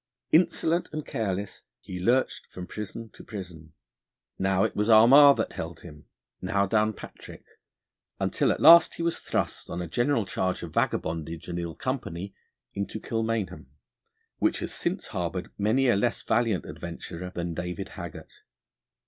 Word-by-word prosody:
Insolent 170 Hz, 0 st, +2 dB
and 155 Hz, -1 st, -4 dB
careless, 100 Hz, -2 st, -3 dB, 0.2 s
he 90 Hz, -1 st, -7 dB
lurched 120 Hz, +8 st, +1 dB
from 90 Hz, -, -8 dB
prison 110 Hz, +3 st, -7 dB
to -, -, -13 dB
prison; 85 Hz, -6 st, -9 dB, 0.7 s
now 95 Hz, 0 st, +2 dB
it 110 Hz, -, -1 dB
was 105 Hz, +2 st, 0 dB
Armagh 135 Hz, +6 st, +8 dB
that -, -, -1 dB
held 80 Hz, 0 st, -6 dB
him, 75 Hz, -4 st, -12 dB, 0.4 s
now 100 Hz, +2 st, +1 dB
Downpatrick, 110 Hz, +1 st, -3 dB, 0.7 s
until -, -, +1 dB
at -, -, -2 dB
last 165 Hz, +2 st, +8 dB
he 170 Hz, -, -4 dB
was 170 Hz, 0 st, 0 dB
thrust -, -, -3 dB
on 85 Hz, -, -4 dB
a 90 Hz, -, -4 dB
general 120 Hz, -, +1 dB
charge 95 Hz, -1 st, -2 dB
of 80 Hz, -3 st, -7 dB
vagabondage 80 Hz, +1 st, -2 dB
and 85 Hz, -1 st, -3 dB
ill 85 Hz, -1 st, -5 dB
company 100 Hz, -8 st, -4 dB, 0.4 s
into 100 Hz, +2 st, -4 dB
Kilmainham, 110 Hz, -, -2 dB, 0.7 s
which -, -, +2 dB
has -, -, -4 dB
since -, -, -3 dB
harboured 90 Hz, 0 st, -3 dB
many 110 Hz, +6 st, +2 dB
a 120 Hz, -, +4 dB
less 120 Hz, +5 st, 0 dB
valiant 110 Hz, -4 st, +1 dB
adventurer 85 Hz, +2 st, -7 dB
than 85 Hz, -1 st, -3 dB
David 90 Hz, +1 st, -5 dB
Haggart. -, -, -9 dB
100 Hz, 150 wpm, -27 LUFS, 85-115 Hz, 0.7 s, Armagh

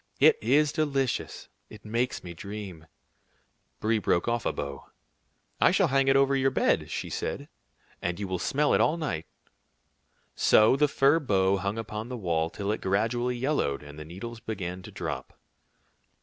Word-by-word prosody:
"It 460 Hz, -, +6 dB
is 150 Hz, 0 st, +3 dB
delicious. 135 Hz, -5 st, -1 dB, 0.2 s
It 105 Hz, 0 st, -13 dB
makes 120 Hz, +4 st, -1 dB
me 85 Hz, -1 st, -7 dB
dream." 95 Hz, -3 st, -8 dB, 0.9 s
Brie 110 Hz, +1 st, +1 dB
broke 85 Hz, -1 st, +1 dB
off 120 Hz, -1 st, 0 dB
a -, -, +1 dB
bough. 70 Hz, -1 st, -6 dB, 0.7 s
"I -, -, +6 dB
shall -, -, +3 dB
hang 135 Hz, 0 st, +2 dB
it 135 Hz, -, +5 dB
over 135 Hz, 0 st, +4 dB
your 135 Hz, 0 st, +3 dB
bed," -, -, +1 dB
she -, -, -4 dB
said, -, -, -4 dB, 0.5 s
"and 85 Hz, +1 st, -2 dB
you 100 Hz, -, -3 dB
will 95 Hz, -1 st, -2 dB
smell 145 Hz, +10 st, +1 dB
it -, -, +4 dB
all 160 Hz, -, +2 dB
night." 85 Hz, -, -3 dB, 1.1 s
So 110 Hz, +4 st, +5 dB
the 150 Hz, +2 st, +3 dB
fir 140 Hz, +3 st, +3 dB
bough 100 Hz, -8 st, +2 dB
hung 100 Hz, +3 st, -2 dB
upon 110 Hz, +1 st, -5 dB
the 125 Hz, -, -4 dB
wall 85 Hz, -5 st, 0 dB
till 100 Hz, +3 st, -3 dB
it 110 Hz, -, -3 dB
gradually 120 Hz, +5 st, 0 dB
yellowed, 125 Hz, -, 0 dB
and 75 Hz, +1 st, -11 dB
the -, -, -6 dB
needles 105 Hz, +8 st, -8 dB
began 95 Hz, -5 st, -5 dB
to -, -, -11 dB
drop. -, -, -6 dB
110 Hz, 170 wpm, -28 LUFS, 95-135 Hz, 1.1 s, It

